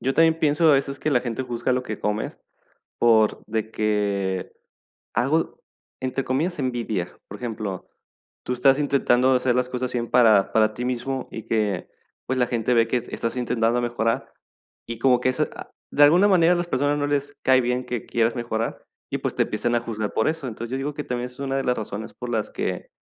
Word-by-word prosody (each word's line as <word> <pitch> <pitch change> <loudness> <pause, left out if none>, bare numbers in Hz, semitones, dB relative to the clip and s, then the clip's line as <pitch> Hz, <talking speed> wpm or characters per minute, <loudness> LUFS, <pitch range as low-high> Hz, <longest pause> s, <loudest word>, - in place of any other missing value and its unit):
Yo 135 +1 0
también 165 0 +4
pienso 155 0 +3
a - - +6
veces 140 0 0
que 155 - -1
la 125 - +3
gente 120 +1 -3
juzga 120 0 -1
lo 125 - 0
que 110 -4 -5
comes, 105 +1 -2 0.6
por 110 -2 +4
de 110 0 -2
que 100 -3 -1 0.6
hago, 155 +6 0 0.4
entre 130 +1 -2
comillas 160 +8 -1
"envidia". 115 -9 -2
Por - - -8
ejemplo, 110 -6 -5 0.6
tú 125 - -2
estás 135 +3 +4
intentando 130 -3 +3
hacer 125 -1 +2
las 125 0 +1
cosas 125 0 -3
bien 120 -1 -2
para 110 -5 +5
para 110 -1 +3
ti 125 +2 -4
mismo 130 +1 -2
y 110 - -6
que, 105 -5 -1 0.4
pues, 130 0 -1
la 125 - +3
gente 120 0 0
ve 115 -1 +4
que 120 0 0
estás 115 +2 -3
intentando 120 -1 +1
mejorar, 115 -1 -1 0.5
y 115 -1 -5
como 125 -1 +4
que 130 - +2
eso, 130 - 0
ah, - - -10 0.2
de 145 - +5
alguna 175 +7 +6
manera 180 -3 +5
a - - +1
las 175 0 -2
personas 145 0 +1
no 145 - 0
les 145 0 -1
cae 130 -1 +5
bien 125 +1 -1
que 120 -3 -4
quieras 115 +1 +1
mejorar, 115 -1 -3 0.2
y, - - -2
pues, - - -3
te - - +3
empiecen 120 0 -1
a 120 - +1
juzgar 110 -3 -4
por 110 - +1
eso. 155 -4 -3
Entonces, 115 +1 -6
yo 130 - -1
digo 140 +2 -3
que 150 - -4
también 125 -2 -3
es 125 +1 -16
una 135 -1 -1
de 135 - -1
las 125 -1 +1
razones 110 0 -5
por 125 - -7
las 110 -3 -1
que - - -3
125 Hz, 210 wpm, -24 LUFS, 115-135 Hz, 0.6 s, a